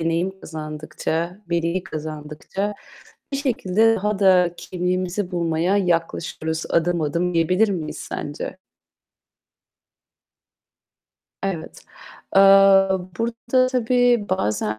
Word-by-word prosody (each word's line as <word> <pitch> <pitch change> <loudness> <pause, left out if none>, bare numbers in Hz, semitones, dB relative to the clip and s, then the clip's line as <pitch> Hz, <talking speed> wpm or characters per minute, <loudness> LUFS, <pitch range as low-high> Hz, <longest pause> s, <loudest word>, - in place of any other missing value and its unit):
deneyim 170 +4 -1
kazandıkça, 155 +3 -4
bilgi 170 +2 -1
kazandıkça 155 +5 -5 0.6
bir 275 - 0
şekilde 225 -5 +2
daha 210 0 -1
da 180 -3 +4
kimliğimizi 185 +1 -2
bulmaya 170 +2 0
yaklaşıyoruz 165 -3 -1
adım 170 +1 +1
adım, 170 +4 -1
diyebilir 180 +6 +3
miyiz 170 -6 -4
sence? 145 +5 -6 2.9
Evet. 185 -5 -4 0.5
Eee, 195 - +8 0.8
burada 235 +2 +1
tabii 245 -3 +2
bazen, 110 - -1
180 Hz, 85 wpm, -22 LUFS, 160-200 Hz, 2.9 s, Eee